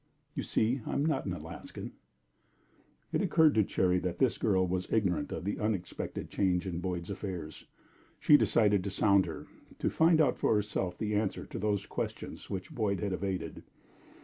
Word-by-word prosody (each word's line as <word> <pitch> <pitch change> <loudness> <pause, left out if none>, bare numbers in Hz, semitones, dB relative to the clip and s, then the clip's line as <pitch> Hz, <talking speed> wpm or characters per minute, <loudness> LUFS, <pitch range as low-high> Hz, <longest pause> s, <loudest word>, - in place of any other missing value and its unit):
"You - - -2
see, 120 +4 0
I - - -2
am 140 - +1
not 155 -8 0
an 90 - -1
Alaskan." 80 -1 -8 1.2
It - - +2
occurred 160 -3 +4
to 110 - +4
Cherry 90 -1 +2
that 90 -1 -3
this 125 +2 +2
girl 95 -4 +3
was 90 0 -2
ignorant 90 -9 +1
of - - -4
the 100 - -2
unexpected 105 -5 -3
change 90 -2 +1
in 85 -3 -3
Boyd's 90 0 -3
affairs. 90 -6 -6 0.5
She 150 - +6
decided 105 -5 +4
to 100 - -2
sound 100 -1 +3
her 80 - -6 0.3
to - - 0
find 160 0 +4
out 145 -5 +3
for - - +3
herself 100 -4 -1
the 105 -1 -2
answer 105 -1 -1
to - - -6
those 100 -1 0
questions - - -5
which 95 -2 -5
Boyd 100 -4 0
had 100 0 -1
evaded. 95 -1 -3
100 Hz, 175 wpm, -31 LUFS, 90-110 Hz, 1.2 s, She